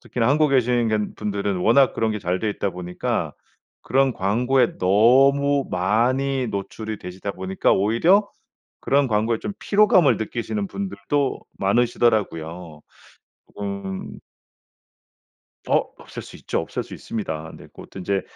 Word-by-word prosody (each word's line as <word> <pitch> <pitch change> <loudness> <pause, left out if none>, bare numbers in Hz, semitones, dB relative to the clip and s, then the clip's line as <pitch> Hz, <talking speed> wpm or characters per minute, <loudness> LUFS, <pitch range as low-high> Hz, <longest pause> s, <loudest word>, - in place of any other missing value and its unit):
특히나 120 -1 -1
한국에 145 0 +3
계신 120 -2 +2
건 105 -1 -1
분들은 100 -2 -2
워낙 120 +8 +4
그런 110 -1 0
게 105 - -3
잘 90 +1 -1
돼 110 - -1
있다 100 -1 -2
보니까 90 -1 -3 0.5
그런 135 0 +2
광고에 120 +6 +1
너무 135 +8 +4
많이 125 +8 +1
노출이 110 +1 -5
되시다 95 +2 -6
보니까 95 0 0
오히려 160 - +3 0.5
그런 140 0 +2
광고에 110 0 0
좀 205 - -5
피로감을 185 - +4
느끼시는 120 - -3
분들도 145 - -2 0.2
많으시더라고요. 95 -8 0 0.8
음. 100 -1 -5 1.5
어 - - +4 0.2
없앨 - - -9
수 - - -12
있죠. - - -2
없앨 - - -4
수 - - -10
있습니다. 80 -8 -5
네. - - -13
그것도 - - -13
이제 95 +1 -1
110 Hz, 290 characters per minute, -22 LUFS, 95-135 Hz, 1.5 s, 워낙